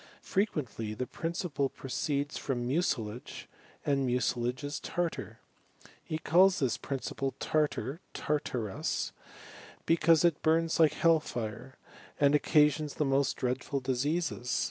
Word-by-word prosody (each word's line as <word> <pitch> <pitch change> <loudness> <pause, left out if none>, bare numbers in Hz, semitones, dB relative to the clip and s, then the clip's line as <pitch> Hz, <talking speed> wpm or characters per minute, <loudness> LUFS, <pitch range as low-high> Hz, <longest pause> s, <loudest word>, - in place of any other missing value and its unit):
Frequently 130 - -1
the 125 - -2
principle 165 -2 -2
proceeib 140 +2 -2
from 125 -3 -2
mucilage, 125 -6 -2 0.4
and 140 -1 +2
mucilage 125 +1 0
is 145 +1 -3
tartar. 135 - -3 0.6
He 155 - -3
calls 180 +4 +5
thjj 130 -6 0
principle 135 0 -3
iar(arf"iar(arui) 145 - -2 0.8
hecause 165 0 +5
it 170 -3 +2
bums 165 +1 +2
like 160 -2 +6
hel^ 165 -2 +4
fire, 120 +1 -6 0.4
and 140 0 +5
occasions 150 0 +3
the 150 - +1
most 135 0 +2
dreadful 130 +2 -1
diseases. 130 +1 -1
140 Hz, 110 wpm, -31 LUFS, 125-160 Hz, 0.8 s, like